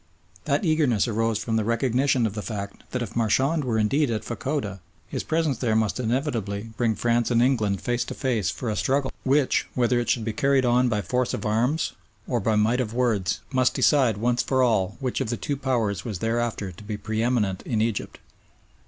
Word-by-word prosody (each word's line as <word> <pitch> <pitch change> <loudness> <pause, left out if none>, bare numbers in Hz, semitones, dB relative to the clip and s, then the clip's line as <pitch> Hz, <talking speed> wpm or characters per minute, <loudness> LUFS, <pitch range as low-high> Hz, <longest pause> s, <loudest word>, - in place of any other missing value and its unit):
That 210 - +1
eagerness 150 - +2
arose 115 -1 0
from 110 +1 -1
the 110 - +1
recognition 125 +2 +1
of 105 - -1
the 105 - -4
fact 100 0 -6
that 125 -1 -2
if 110 - -8
Marchand 135 +7 +2
were 120 -4 0
indeed 130 +7 +2
at 110 -2 -2
Fachoda, 120 -5 -3 0.3
his - - -3
presence 160 -5 0
there 115 -4 +1
must 110 +2 +1
inevitably 115 -4 -2
bring 115 -2 +1
France 120 0 +1
and 120 -2 +3
England 115 -6 +2
face 120 0 0
to - - -6
face 120 -7 0
for 125 - -5
a - - -2
struggle 130 +9 0
which, 135 0 +2
whether 125 -1 +2
it 120 - -2
should 115 -3 +1
be 110 - -2
carried 135 +3 +2
on 125 +1 +3
by 105 -3 -1
force 125 +6 0
of - - -6
arms 120 +9 +1 0.3
or 120 - 0
by 110 +1 +1
might 110 +4 +2
of 115 -2 -4
words, 110 -8 0
must 130 -1 +2
decide 130 -8 +3
once 120 +3 +1
for 130 -1 +1
all 100 -6 +1
which 130 -1 -2
of 125 - -2
the 120 - -1
two 145 - -2
Powers 115 -8 -1
was 110 -5 -4
thereafter 115 -2 -1
to 90 - -13
be 105 0 -4
pre 110 +1 -3
eminent 110 -6 0
in 115 - -2
Egypt. 110 -1 -2
120 Hz, 205 wpm, -25 LUFS, 110-130 Hz, 0.3 s, and